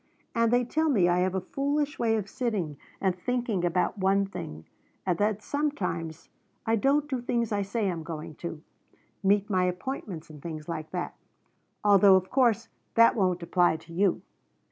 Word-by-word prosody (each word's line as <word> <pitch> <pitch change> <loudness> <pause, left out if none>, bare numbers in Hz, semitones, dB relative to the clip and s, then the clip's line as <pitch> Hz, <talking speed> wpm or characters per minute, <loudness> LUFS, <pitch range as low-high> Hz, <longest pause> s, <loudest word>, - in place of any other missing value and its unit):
And 230 -1 +2
they 245 0 +3
tell 315 +6 +1
me 200 -11 +4
I 175 0 +3
have 185 +1 +1
a 190 - 0
foolish 285 +7 -1
way 225 -1 +2
of 210 -3 -2
sitting 205 - -2 0.2
and 190 -2 +1
thinking 235 -1 -1
about 180 +4 0
one 195 +1 +3
thing, 80 - -7 0.4
and 180 -2 +2
that 210 0 +1
sometimes 195 - -2 0.4
I 225 - +3
don't 280 +6 +2
do 260 -4 -2
things 235 -2 -1
I 205 -1 +1
say 200 +2 -1
I - - +1
am 170 -2 -4
going 160 -1 -6
to 165 -2 -6 0.6
meet 200 0 +3
my 185 -3 +2
appointments 180 - -4
and 150 -2 -12
things 155 -2 -6
like 155 -2 -4
that, 180 -1 -3 0.7
although 200 -1 +7
of 185 0 0
course 235 -4 +3 0.3
that 230 0 +6
won't 185 -4 +1
apply 175 -1 +3
to 165 +1 -14
you. 190 +1 +1
195 Hz, 180 wpm, -28 LUFS, 175-230 Hz, 0.7 s, although